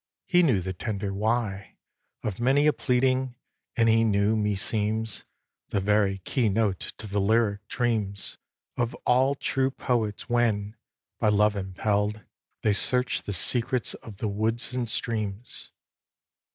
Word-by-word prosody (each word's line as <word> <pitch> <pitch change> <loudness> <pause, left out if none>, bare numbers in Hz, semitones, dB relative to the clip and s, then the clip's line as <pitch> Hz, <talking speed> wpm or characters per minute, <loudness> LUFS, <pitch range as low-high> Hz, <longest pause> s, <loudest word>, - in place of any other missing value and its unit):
He 180 -1 +4
knew 130 - +3
the 95 +1 -4
tender 100 +1 -3
"why" 105 -1 -2 0.5
Of 105 +1 -3
many 135 +4 +4
a 150 - +5
pleading, 130 0 +1 0.4
and 115 -1 +4
he 115 0 +4
knew, 105 0 +2
meseems, 105 +1 -1 0.4
The 100 - 0
very 100 0 +2
key 110 +5 0
note 100 -2 +1 0.2
to - - -9
the 100 0 -1
lyric 100 -1 +1
dreams 110 -6 -2 0.4
Of 120 -1 -1
all 130 +3 +3
true 135 -1 0
poets 115 -6 -2
when, 110 -3 +1 0.4
by 105 - +3
love 105 0 +3
impell'd, 105 +2 -1 0.4
They 105 - +3
search 125 +5 +1
the 100 - -4
secrets 120 +6 +1
of 105 -4 -11
the 110 - -2
woods 110 +5 0
and 125 -2 -2
streams. 110 -1 -3
110 Hz, 140 wpm, -27 LUFS, 100-120 Hz, 0.5 s, a